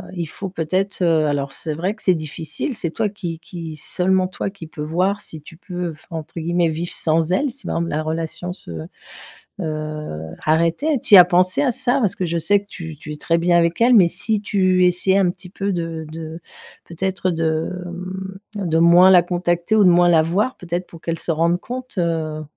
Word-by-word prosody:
il 170 -2 -2
faut 190 +5 -6
peut-être, 185 +3 -2
heu, 160 -3 +3
alors 140 -1 -2
c'est 155 +2 -4
vrai 180 +6 -1
que 220 - -14
c'est 185 - +4
difficile, 160 - -3
c'est 175 -6 -2
toi 220 +5 0
qui 175 -5 -6
qui 165 -2 -8
seulement 185 +4 +1
toi 185 +1 -4
qui 195 -4 -10
peux 155 -1 -9
voir 180 +6 0
si 160 -6 -4
tu 165 - -13
peux 180 -1 -5
v 155 - -9
entre 165 +1 -6
guillemets 170 +1 +1
«vivre 165 +2 -4
sans 160 +1 +1
elle», 275 +8 +1
si 270 +3 -9
par - - -2
exemple, 170 0 -2
la 150 - -1
relation 165 +3 -3
se, 90 - -11 0.9
heu, 155 - -4 0.2
arrêtait. 170 - +2
Tu - - +1
y - - +12
as 180 - +11
pensé 180 +4 +2
à 265 - +2
ça? 255 +2 +1
Parce 205 -6 +1
que 185 - -2
je 170 0 -1
sais 205 +5 +3
que 200 - -23
tu 160 -6 -8
tu 150 0 -9
es - - -8
très 165 +2 +1
bien 175 +1 +2
avec 170 +4 +1
elle, 245 +2 +6
mais 190 -6 +7
si 205 +4 0
tu 185 -3 +2
essayais 180 +2 +2
un 185 -2 +3
petit 185 0 -12
peu 200 +1 -2
de 165 -2 -4
de, 160 +1 -7 0.4
peut-être, 185 +2 -2
de, 160 -1 -1 0.9
mmh, 200 -3 -3
de 160 -1 +1
moins 175 +3 +7
la 180 -2 +8
contacter 175 +2 0
ou 215 - +5
de 185 - +7
moins 175 0 +5
la 160 -2 +5
voir, 200 +10 0
peut-être, 175 +1 -4
pour 165 - -13
qu'elle 165 -1 -3
se - - -5
rende 170 +2 +1
compte, 255 +1 -7
heu, 160 -2 -1
175 Hz, 220 wpm, -21 LUFS, 160-190 Hz, 0.9 s, y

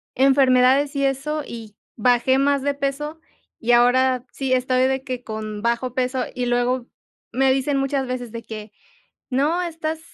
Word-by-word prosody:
enfermedades 270 +1 +4
y 275 0 +1
eso, 285 +3 -1
y 225 -3 -9 0.2
bajé 245 +3 +3
más 280 0 +2
de 285 +1 0
peso, 290 +3 -3 0.4
y 240 +1 0
ahora 250 +1 +4
sí 265 -2 -2
estoy 255 0 +2
de 265 0 -1
que 255 -2 -5
con 215 -1 -6
bajo 235 +1 0
peso. 255 0 0
Y 250 -1 -1
luego 245 +1 0 0.5
me 265 +2 +3
dicen 270 +1 0
muchas 275 0 0
veces 245 -2 -4
de 230 0 -7
que: 215 -1 -8 0.6
"No, 300 +7 +1
estás 320 -2 -4
260 Hz, 160 wpm, -22 LUFS, 245-275 Hz, 0.6 s, enfermedades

